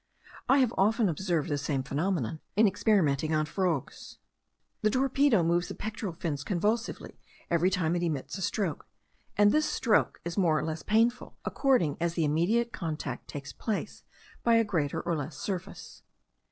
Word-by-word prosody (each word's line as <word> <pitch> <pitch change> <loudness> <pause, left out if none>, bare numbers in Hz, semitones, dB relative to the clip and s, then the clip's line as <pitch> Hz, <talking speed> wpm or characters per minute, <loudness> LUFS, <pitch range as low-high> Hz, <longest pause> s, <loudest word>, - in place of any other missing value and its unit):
I 270 - +6
have 255 -4 +3
often 220 +3 +3
observed 170 -2 -1
the 145 -1 -1
same 140 -2 -1
phenomenon 155 - -1 0.2
in 215 +3 +5
experimenting 160 - +2
on 155 0 +1
frogs. 170 -3 -3 0.6
The 215 - +3
torpedo 265 -4 +3
moves 170 +1 +1
the - - -6
pectoral 215 -3 -4
fins 155 -4 -3
convulsively 210 +7 -2 0.3
every 170 +2 +3
time 175 -3 0
it 175 - -1
emits 145 -5 -2
a 195 - -6
stroke; 185 -3 -2 0.5
and 205 0 +6
this 305 0 +2
stroke 220 -3 +1
is 170 +3 -2
more 165 -5 +3
or - - -1
less 160 0 -3
painful, 230 +3 +1
according 250 - +2
as 170 0 0
the 165 - +1
immediate 195 +11 +1
contact 160 -3 -4
takes 145 -2 -7
place 215 -3 -4 0.4
by 235 -1 +4
a 230 - +5
greater 165 -9 -1
or 170 - -1
less 145 0 -5
surface. 190 -1 -6
175 Hz, 165 wpm, -29 LUFS, 155-215 Hz, 0.6 s, I